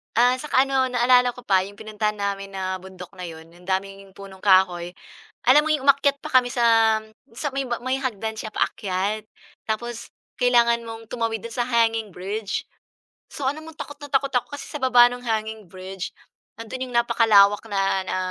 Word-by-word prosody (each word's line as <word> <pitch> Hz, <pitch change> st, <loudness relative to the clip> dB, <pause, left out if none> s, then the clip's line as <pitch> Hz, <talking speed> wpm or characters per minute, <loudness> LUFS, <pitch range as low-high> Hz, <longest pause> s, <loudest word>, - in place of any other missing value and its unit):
Ah, 245 Hz, +2 st, +5 dB
saka 270 Hz, -1 st, +1 dB
ano, 265 Hz, -1 st, +1 dB
naalala 250 Hz, 0 st, +4 dB
ko 245 Hz, -, -13 dB
pa 190 Hz, -6 st, +2 dB
yung 200 Hz, +1 st, -11 dB
pinuntahan 215 Hz, -1 st, -3 dB
namin 200 Hz, -1 st, -3 dB
na 190 Hz, -1 st, -3 dB
bundok 190 Hz, 0 st, -11 dB
na 180 Hz, -, -8 dB
yun, 160 Hz, -2 st, -9 dB
yun 175 Hz, +2 st, -19 dB
daming 195 Hz, +1 st, -3 dB
yun 195 Hz, -, -18 dB
punong 190 Hz, -1 st, -13 dB
kahoy, 185 Hz, -3 st, +3 dB, 0.6 s
alam 285 Hz, +4 st, +7 dB
mo 310 Hz, -, 0 dB
yung 290 Hz, -3 st, -1 dB
umakyat 280 Hz, 0 st, +4 dB
pa -, -, -7 dB
kami 245 Hz, -1 st, +5 dB
sa 225 Hz, -3 st, +4 dB, 0.6 s
may 275 Hz, -, 0 dB
ma 240 Hz, -2 st, -3 dB
may 255 Hz, +2 st, -1 dB
hagdan 225 Hz, -5 st, -3 dB
siya 220 Hz, 0 st, -6 dB
paakyat, 200 Hz, +2 st, -1 dB, 0.4 s
tapos 235 Hz, +2 st, -4 dB, 0.2 s
kailangan 235 Hz, -1 st, +3 dB
mong 225 Hz, 0 st, -9 dB
tumawid 230 Hz, -1 st, -2 dB
do'n 230 Hz, 0 st, -7 dB
sa 245 Hz, -, +1 dB
hanging 225 Hz, -3 st, +1 dB
bridge. 200 Hz, +4 st, -4 dB, 0.6 s
So, 280 Hz, -, -6 dB
alam 290 Hz, +4 st, -1 dB
mong 320 Hz, -1 st, -12 dB
takot 290 Hz, -2 st, -8 dB
na 290 Hz, -, -8 dB
takot 275 Hz, 0 st, 0 dB
ako 250 Hz, +3 st, -1 dB
kasi -, -, -8 dB
sa 295 Hz, -, -7 dB
baba 250 Hz, -2 st, +7 dB
ng 245 Hz, -, -8 dB
hanging 220 Hz, -4 st, -3 dB
bridge 185 Hz, 0 st, -7 dB, 0.5 s
nandun 230 Hz, +3 st, -5 dB
yung 245 Hz, -, -8 dB
napakalawak 205 Hz, -4 st, +5 dB
na 195 Hz, -1 st, +1 dB
na 185 Hz, -, -2 dB
225 Hz, 185 wpm, -23 LUFS, 195-250 Hz, 0.6 s, alam